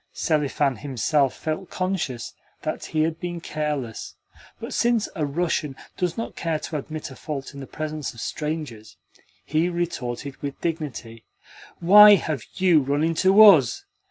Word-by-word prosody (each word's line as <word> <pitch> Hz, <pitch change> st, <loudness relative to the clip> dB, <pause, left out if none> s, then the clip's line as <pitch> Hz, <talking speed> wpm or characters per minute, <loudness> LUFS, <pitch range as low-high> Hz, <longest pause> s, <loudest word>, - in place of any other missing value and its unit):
Selifan 145 Hz, -4 st, 0 dB
himself 135 Hz, +2 st, 0 dB
felt 160 Hz, +4 st, -4 dB
conscious 185 Hz, -10 st, -3 dB, 0.3 s
that -, -, -4 dB
he 155 Hz, -1 st, 0 dB
had 160 Hz, 0 st, -2 dB
been 175 Hz, -1 st, -4 dB
careless, 150 Hz, -8 st, -4 dB, 0.4 s
but -, -, -6 dB
since 235 Hz, -2 st, +1 dB
a 155 Hz, -5 st, -1 dB
Russian 150 Hz, -2 st, -1 dB, 0.2 s
does 180 Hz, -2 st, -2 dB
not 230 Hz, -, -5 dB
care 165 Hz, -2 st, -1 dB
to 155 Hz, 0 st, -5 dB
admit 155 Hz, 0 st, -7 dB
a -, -, -10 dB
fault 140 Hz, -2 st, -6 dB
in 140 Hz, -, -9 dB
the 135 Hz, -, -8 dB
presence 155 Hz, -2 st, -5 dB
of 115 Hz, -, -14 dB
strangers, 145 Hz, -8 st, -5 dB, 0.5 s
he 160 Hz, +3 st, +1 dB
retorted 140 Hz, -6 st, -4 dB
with 140 Hz, -1 st, -6 dB
dignity: 145 Hz, -9 st, -5 dB, 0.6 s
"Why 205 Hz, +4 st, +9 dB
have 155 Hz, -, -3 dB
you 180 Hz, -5 st, +4 dB
run 140 Hz, +3 st, 0 dB
into 185 Hz, +5 st, +3 dB
US? 155 Hz, -, +6 dB
155 Hz, 150 wpm, -24 LUFS, 140-170 Hz, 0.6 s, Why